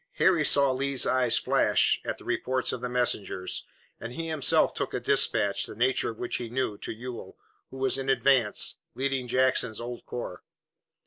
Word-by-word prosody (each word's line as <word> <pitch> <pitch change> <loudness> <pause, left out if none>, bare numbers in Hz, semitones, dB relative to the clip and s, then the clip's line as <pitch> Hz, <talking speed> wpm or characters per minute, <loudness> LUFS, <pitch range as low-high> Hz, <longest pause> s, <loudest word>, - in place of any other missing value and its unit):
Harry 175 -5 +3
saw 140 -2 +5
Lee's 135 0 +1
eyes 125 -2 +2
flash - - +2
at - - -4
the - - -15
reports 130 0 -1
of 120 - -5
the 125 - -3
messengers, 120 -6 -1 0.3
and 115 +1 -7
he 165 +4 -4
himself 155 -3 +2
took - - -4
a - - -1
dispatch, 100 -1 +1
the - - -9
nature 125 +4 +1
of 115 - -8
which 120 - -3
he 120 -2 -6
knew, 120 -3 -2
to - - -7
Ewell, 120 +2 -8 0.3
who 135 - -10
was 135 0 0
in 135 0 -4
advance, 135 -5 +2 0.2
leading 135 -1 -2
Jackson's 125 -3 +1
old 120 0 -7
corps. 105 -7 -6
125 Hz, 180 wpm, -27 LUFS, 120-135 Hz, 0.3 s, saw